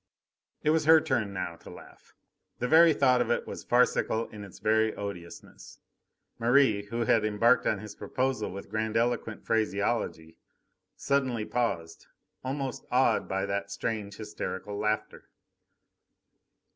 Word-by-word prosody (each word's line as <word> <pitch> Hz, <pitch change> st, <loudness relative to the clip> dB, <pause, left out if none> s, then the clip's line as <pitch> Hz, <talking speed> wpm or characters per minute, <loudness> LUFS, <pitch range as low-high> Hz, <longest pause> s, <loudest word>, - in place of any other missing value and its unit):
It 150 Hz, -, +3 dB
was 160 Hz, -1 st, +1 dB
her 160 Hz, +1 st, +8 dB
turn 120 Hz, -9 st, -1 dB
now 85 Hz, -3 st, -4 dB
to -, -, -14 dB
laugh. -, -, -15 dB, 0.4 s
The 125 Hz, -, -2 dB
very 165 Hz, +3 st, +7 dB
thought 130 Hz, -4 st, +3 dB
of -, -, -1 dB
it -, -, 0 dB
was -, -, -7 dB
farcical 120 Hz, -2 st, +2 dB
in 105 Hz, -1 st, -9 dB
its 100 Hz, -, -12 dB
very 110 Hz, 0 st, +1 dB
odiousness. 95 Hz, -4 st, -9 dB, 0.6 s
Merri, 115 Hz, -4 st, +3 dB
who 115 Hz, +3 st, -3 dB
had 115 Hz, -1 st, +3 dB
embarked 110 Hz, +3 st, +3 dB
on 105 Hz, -, +1 dB
his 105 Hz, +1 st, -9 dB
proposal 130 Hz, +4 st, -2 dB
with 100 Hz, +1 st, -9 dB
grandiloquent 110 Hz, +1 st, -1 dB
phraseology, 100 Hz, -6 st, -1 dB, 0.6 s
suddenly 130 Hz, -6 st, 0 dB
paused, 85 Hz, -11 st, -3 dB, 0.4 s
almost 135 Hz, 0 st, -4 dB
awed 125 Hz, -3 st, +2 dB
by 95 Hz, 0 st, -1 dB
that 100 Hz, 0 st, -3 dB
strange, 100 Hz, 0 st, -4 dB
hysterical 105 Hz, -1 st, -5 dB
laughter. 105 Hz, +1 st, -3 dB
110 Hz, 130 wpm, -28 LUFS, 100-125 Hz, 0.6 s, her